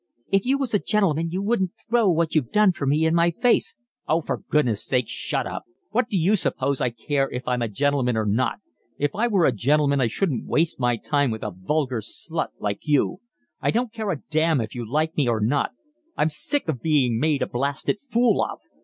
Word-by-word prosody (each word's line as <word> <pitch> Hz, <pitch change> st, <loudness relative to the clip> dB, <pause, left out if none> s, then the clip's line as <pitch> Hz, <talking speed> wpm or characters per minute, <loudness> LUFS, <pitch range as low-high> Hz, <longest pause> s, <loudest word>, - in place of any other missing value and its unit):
"If 195 Hz, +4 st, +2 dB
you 270 Hz, +2 st, +3 dB
was 270 Hz, -5 st, -3 dB
a 205 Hz, -, +4 dB
gentleman 165 Hz, -7 st, +1 dB
you 185 Hz, +4 st, -3 dB
wouldn't 200 Hz, -4 st, 0 dB
throw 230 Hz, -3 st, +3 dB
what 165 Hz, -2 st, +1 dB
you've 145 Hz, -7 st, +1 dB
done 210 Hz, -2 st, +5 dB
for 145 Hz, -6 st, -4 dB
me 150 Hz, +4 st, +2 dB
in 160 Hz, -, +2 dB
my 170 Hz, 0 st, +4 dB
face." 235 Hz, +8 st, +1 dB, 0.3 s
"Oh, 160 Hz, +2 st, +2 dB
for -, -, -3 dB
goodness' 125 Hz, -9 st, +2 dB
sake, 125 Hz, -2 st, +1 dB
shut -, -, -2 dB
up. -, -, -6 dB, 0.3 s
What 230 Hz, +1 st, +1 dB
d'you 190 Hz, +1 st, +2 dB
suppose 140 Hz, -7 st, -1 dB
I -, -, +2 dB
care 135 Hz, +4 st, -1 dB
if 125 Hz, 0 st, -6 dB
I'm 125 Hz, -1 st, 0 dB
a 120 Hz, -, 0 dB
gentleman 125 Hz, +1 st, 0 dB
or 110 Hz, -, 0 dB
not? 110 Hz, +5 st, +1 dB, 0.4 s
If 145 Hz, 0 st, 0 dB
I 235 Hz, +3 st, +1 dB
were 195 Hz, -7 st, +3 dB
a -, -, +4 dB
gentleman 140 Hz, +4 st, +2 dB
I 120 Hz, -, +3 dB
shouldn't 135 Hz, -, -1 dB
waste 160 Hz, -2 st, +1 dB
my 120 Hz, -2 st, +1 dB
time 145 Hz, +3 st, +1 dB
with 110 Hz, -1 st, -4 dB
a 105 Hz, -, -4 dB
vulgar 130 Hz, +4 st, -1 dB
slut -, -, -4 dB
like 100 Hz, -1 st, -2 dB
you. 150 Hz, +4 st, +1 dB, 0.4 s
I -, -, +1 dB
don't 235 Hz, 0 st, 0 dB
care 220 Hz, -3 st, -3 dB
a 160 Hz, -8 st, -3 dB
damn 155 Hz, -1 st, +2 dB
if 110 Hz, -2 st, -4 dB
you 120 Hz, -2 st, -6 dB
like 155 Hz, +2 st, 0 dB
me 145 Hz, -4 st, +1 dB
or 115 Hz, -2 st, +1 dB
not. 125 Hz, +7 st, +1 dB, 0.5 s
I'm 155 Hz, -, +2 dB
sick 275 Hz, -, -2 dB
of 140 Hz, -7 st, -2 dB
being 135 Hz, -8 st, +2 dB
made 150 Hz, 0 st, +1 dB
a -, -, -2 dB
blasted 140 Hz, +10 st, -1 dB
fool 240 Hz, +1 st, +3 dB
of. -, -, -4 dB
150 Hz, 220 wpm, -24 LUFS, 125-185 Hz, 0.5 s, done